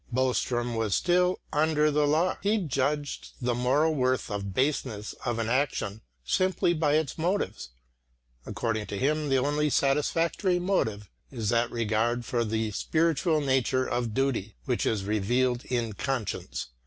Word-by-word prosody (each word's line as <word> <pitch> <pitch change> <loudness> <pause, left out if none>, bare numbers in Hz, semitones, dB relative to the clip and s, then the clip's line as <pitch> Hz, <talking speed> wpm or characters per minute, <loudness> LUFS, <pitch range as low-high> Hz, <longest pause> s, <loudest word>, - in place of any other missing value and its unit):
Boström 120 -1 0
was 110 -3 0
still 180 +1 +2
"under 150 0 +3
the 150 0 +2
law"; 160 +5 +2
he 205 +2 +2
judged 145 -4 -2
the 125 -1 0
moral 135 +7 +2
worth 130 -4 0
or 100 -1 -2
baseness 110 +1 -1
of 120 -2 -1
an 115 -1 -1
action 120 -5 -1 0.2
simply 185 - +2
by 155 -3 +2
its 155 -1 -1
motives; 175 - -1 0.7
according 110 -2 -2
to 100 - -4
him 150 +4 0
the 135 - +3
only 145 +3 +1
satisfactory 165 +7 +1
motive 110 - -1 0.2
is 115 -6 -3
that 120 0 +2
regard 115 +1 0
for 120 0 0
the 110 0 -1
spiritual 160 - +1
nature 130 -1 +1
of 120 -3 -1
duty 130 -6 -1
which 125 -2 0
is 105 -3 0
revealed 120 +5 +1
in 120 -3 -1
conscience. 100 - -3
130 Hz, 145 wpm, -28 LUFS, 115-150 Hz, 0.7 s, under